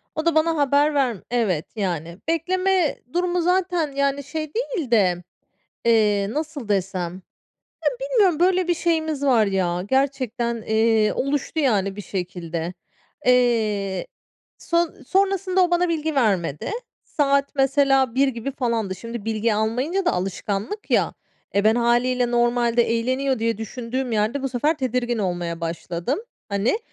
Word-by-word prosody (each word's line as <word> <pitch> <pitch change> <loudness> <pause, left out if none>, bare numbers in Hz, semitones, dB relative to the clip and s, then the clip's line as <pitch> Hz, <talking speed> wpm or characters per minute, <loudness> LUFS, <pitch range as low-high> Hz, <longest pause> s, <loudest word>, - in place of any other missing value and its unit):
O 315 - -2
da 335 -2 +2
bana 320 +1 +3
haber 290 +1 +3
verme 250 -8 0
evet. 200 -10 +1
Yani, 170 -5 -3
bekleme 365 +1 +1 0.2
durumu 355 0 +1
zaten, 355 -3 +1
yani, 280 0 0
şey 310 +2 -5
değil 440 - -3
de, 180 -6 +3 0.6
eee, 210 -3 +3
nasıl 300 -5 -4
desem, 190 -3 -1
yani, 185 - -10 0.8
bilmiyorum 430 -10 +2
böyle 365 0 +3
bir 350 - +3
şeyimiz 315 -3 0
var 245 -6 +4
ya 180 -2 0
gerçekten, 255 -4 0
eee, 220 -1 +3
oluştu, 285 +3 -1
yani, 200 -9 +1
bir 205 - -6
şekilde. 175 -3 -4 0.5
Eee, 215 -7 +2 0.5
son 340 -2 -1
sonrasında 385 -1 +2
o 350 - 0
bana 350 0 +2
bilgi 315 -2 -1
vermedi. 190 - 0 0.3
Saat, 280 -1 +1
mesela, 270 -2 +3
01.00 275 +1 +4
gibi 255 +1 -3
falandı. 230 -7 -1
Şimdi 230 +3 -7
bilgi 225 0 0
almayınca 255 - 0
da - - +3
alışkanlık 195 - -3
ya, - - +2 0.4
e, 200 - +3
ben, 220 +1 +4
hâliyle, 240 +1 +2
normalde 240 0 +2
eğleniyor 255 +3 0
diye 230 -1 0
düşündüğüm 245 +3 -4
yerde 220 +5 0
bu 270 - -1
sefer 295 +6 0
tedirgin 250 -2 -1
olmaya 175 -4 -2
başladım. 170 - -3 0.3
Hani, 200 - +1
245 Hz, 140 wpm, -23 LUFS, 210-305 Hz, 0.8 s, var